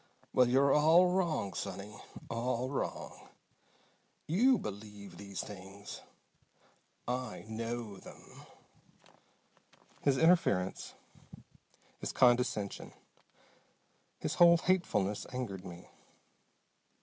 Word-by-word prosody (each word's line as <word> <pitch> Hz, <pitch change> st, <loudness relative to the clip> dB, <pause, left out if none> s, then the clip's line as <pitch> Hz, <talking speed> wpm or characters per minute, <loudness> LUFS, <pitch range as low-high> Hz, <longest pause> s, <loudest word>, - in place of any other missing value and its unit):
Well, 125 Hz, -1 st, +5 dB
you're 135 Hz, +2 st, +4 dB
all 165 Hz, +4 st, +6 dB
wrong, 170 Hz, -, 0 dB
sonny. 100 Hz, +1 st, -6 dB, 0.3 s
All 120 Hz, +2 st, -2 dB
wrong! 140 Hz, -, -5 dB, 1.0 s
You 240 Hz, -, +4 dB
believe 105 Hz, -, -8 dB
these 100 Hz, -1 st, -6 dB
things. 100 Hz, 0 st, -10 dB, 1.1 s
I 125 Hz, -4 st, -4 dB
know 115 Hz, -1 st, -4 dB
them!" -, -, -14 dB, 1.5 s
His 140 Hz, -2 st, +2 dB
interference, 160 Hz, -, +2 dB, 1.0 s
his -, -, -4 dB
condescension, 120 Hz, -5 st, +1 dB, 1.2 s
his -, -, -3 dB
whole 170 Hz, 0 st, +9 dB
hatefulness 135 Hz, -, 0 dB
angered 115 Hz, -8 st, -4 dB
me. 85 Hz, 0 st, -10 dB
120 Hz, 80 wpm, -32 LUFS, 100-150 Hz, 1.5 s, whole